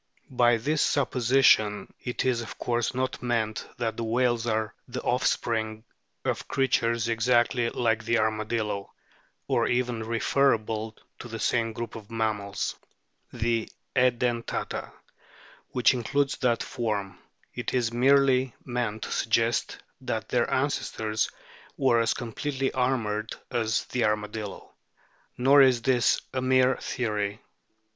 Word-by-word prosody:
By 120 -2 +4
this 150 +7 0
supposition 120 -5 +3
it 125 - -3
is 125 -2 +1
of 115 - -8
course 120 0 -1
not 130 0 -2
meant 115 -3 -1
that 115 -2 -2
the 115 - -2
whales 120 0 +1
are 110 -1 0
the 125 0 -5
offspring 110 -3 0 0.4
of - - -2
creatures 115 -3 +1
exactly 120 +1 +2
like 115 -2 0
the 115 +2 +2
arma 110 0 0
dillo, 105 -3 -2 0.6
or - - +2
even 125 -2 0
referable 110 -1 +1 0.2
to - - -8
the 115 -1 -6
same 115 0 +1
group 115 +1 -6
of 110 -2 -10
mammals 110 -3 -2 0.6
the 115 -1 -1 0.3
Edentata 120 -2 0 0.8
which 125 +1 +3
includes 135 +3 0
that 120 -3 +1
form; 105 -5 -3 0.3
it 125 -2 -3
is 120 -2 0
merely 130 0 +3
meant 120 -3 -2
to - - -5
suggest 115 +2 0 0.2
that - - -3
their - - +1
ancestors 110 0 0 0.5
were 130 -4 +3
as 115 -1 +1
completely 135 +3 -2
armoured 110 -5 -1 0.2
as 115 -3 0
the 125 - 0
armadillo. 105 -1 -3 0.6
Nor 135 +3 +6
is 125 -3 +4
this 125 -2 +3
mere 130 0 +3
theory. 105 -4 -2
115 Hz, 125 wpm, -27 LUFS, 110-125 Hz, 0.8 s, Nor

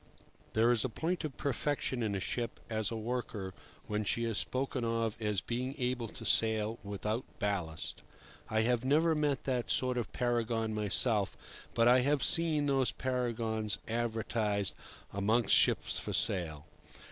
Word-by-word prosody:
There 115 +2 +4
is 120 -3 +3
a 130 - -1
point 165 +10 -2
of 150 -5 -5
perfection 140 -1 -1
in 105 -3 -1
a - - -1
ship 115 +4 -3
as 110 -2 0
a 115 - -4
worker 110 -4 -4 0.3
when 105 0 -1
she 115 +3 0
is 115 -3 0
spoken 130 -1 -2
of 115 -1 0
as 105 -3 0
being 125 +5 -3
able 125 -3 -1
to - - -10
sail 110 0 +3
without 105 +3 -3
ballast. 95 -8 -1 0.5
I 110 0 +2
have 120 +1 +1
never 155 +5 +3
met 150 -3 0
that 125 -3 -1
sort 125 -1 +1
of 115 - -4
paragon 115 -2 0
myself, 105 0 +1 0.4
but 115 0 +4
I 125 +1 +7
have 140 +2 +2
seen 160 -3 +4
these 135 -5 +2
paragons 115 -4 -1
advertised 110 -3 0 0.4
amongst 110 +3 +2
ships - - +4
for - - -5
sale. 80 -6 0
115 Hz, 155 wpm, -32 LUFS, 105-125 Hz, 0.5 s, I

